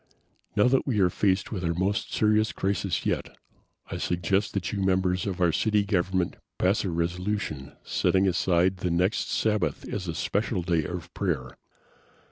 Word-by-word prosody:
Now 105 - +4
that 135 +2 +2
we 115 -6 +1
are 90 -2 +4
faced 95 0 +1
with 95 -5 -3
our 85 -1 0
most 95 +4 -1
serious 110 0 +2
crisis 95 -1 -1
yet, - - -2 0.5
I - - -3
suggest 90 +4 0
that 95 -4 -1
you 100 - -1
members 95 0 +1
of 95 -2 -3
our 85 -2 +4
city 105 +5 +2
government 95 -3 0 0.2
pass 95 +4 +2
a 95 - -1
resolution 85 -3 -2
setting 95 +1 +2
aside 90 +1 +2
the 90 - -2
next 90 +5 +1
Sabbath 105 -1 0
as 95 -3 -4
a 80 - -3
special 100 +2 -1
day 85 -3 +1
of 90 -1 -6
prayer. 75 -11 -2
95 Hz, 165 wpm, -27 LUFS, 85-100 Hz, 0.5 s, Now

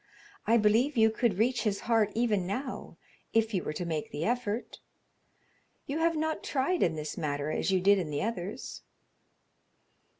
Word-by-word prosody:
I 230 - +5
believe 230 +6 +3
you 220 0 +5
could 220 -3 0
reach 240 +2 +2
his 210 -3 -1
heart 225 -3 +2
even 215 -6 +1
now 250 +7 -5 0.4
if 225 0 +2
you 185 - 0
were - - -3
to 175 - -4
make 160 -3 -3
the 150 +3 -3
effort. 240 -1 -2 1.1
You 285 +3 -3
have 330 0 +2
not 315 0 -1
tried 295 +6 0
in 165 - +2
this 150 -1 -5
matter 145 0 -2
as - - -1
you 190 -1 +3
did 200 +2 +4
in 170 -4 -3
the 145 +3 -2
others." 205 -3 -5
215 Hz, 170 wpm, -30 LUFS, 180-245 Hz, 1.1 s, I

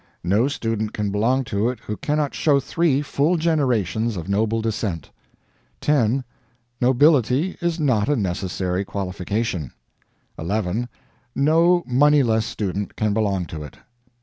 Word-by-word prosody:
No 100 +8 +2
student 115 -6 -2
can 105 -1 -1
belong 120 +6 +1
to 110 -1 0
it 125 - -5
who 105 - -5
cannot 150 +4 -1
show 145 -3 +3
three 145 0 +1
full 150 +5 +1
generations 120 - 0
of 85 0 -6
noble 110 +3 +1
descent. 105 -6 -3 0.7
10. 135 -3 +2 0.6
Nobility 135 - +3
is 170 -1 -1
not 130 -8 +1
a 145 - +3
necessary 95 -2 -2
qualification. 95 - -3 0.7
11. 105 +6 -2 0.5
No 165 +5 +3
moneyless 125 -4 +3
student 100 -1 -3
can 105 -1 0
belong 100 -4 0
to 80 -2 -7
it. 75 -2 -10
115 Hz, 125 wpm, -22 LUFS, 100-140 Hz, 0.7 s, show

